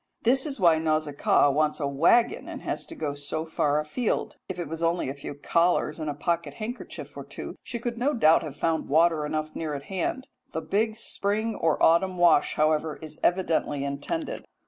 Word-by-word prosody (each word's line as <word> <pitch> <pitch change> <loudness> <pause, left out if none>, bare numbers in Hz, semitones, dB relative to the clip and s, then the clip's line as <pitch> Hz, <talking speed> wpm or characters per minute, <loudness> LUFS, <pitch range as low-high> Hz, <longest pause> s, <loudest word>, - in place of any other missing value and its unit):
This 265 +5 +3
is 275 -5 -4
why 170 -4 +5
Nausicaa 155 -2 +2
wants 150 +2 +1
a 145 - 0
waggon, 165 - +3
and - - -7
has - - -3
to - - -9
go 150 -2 -3
so 145 +3 -4
far 150 -2 +1
afield. 155 +10 -2
If 185 - -4
it 175 -3 -4
was 165 +2 -6
only 170 -3 +1
a - - -3
few 140 0 -8
collars 165 +1 +1
and 155 -1 -3
a 145 - -3
pocket 150 -1 -2
handkerchief 230 - -7
or - - -6
two - - -8
she 240 - -5
could 235 0 -4
no 285 +4 +1
doubt 160 -8 +5
have 150 -4 -7
found 165 -1 -1
water 160 0 +3
enough 155 0 -3
near 155 -2 -3
at 140 - -6
hand. 195 - -3 0.3
The 160 - -2
big 210 +7 0
spring 215 0 -1
or 160 -6 +1
autumn 180 +3 +4
wash, 175 -4 +4
however, 155 0 +1
is 155 -1 -10
evidently 165 -5 +1
intended. 140 - -3
160 Hz, 195 wpm, -26 LUFS, 150-190 Hz, 0.3 s, why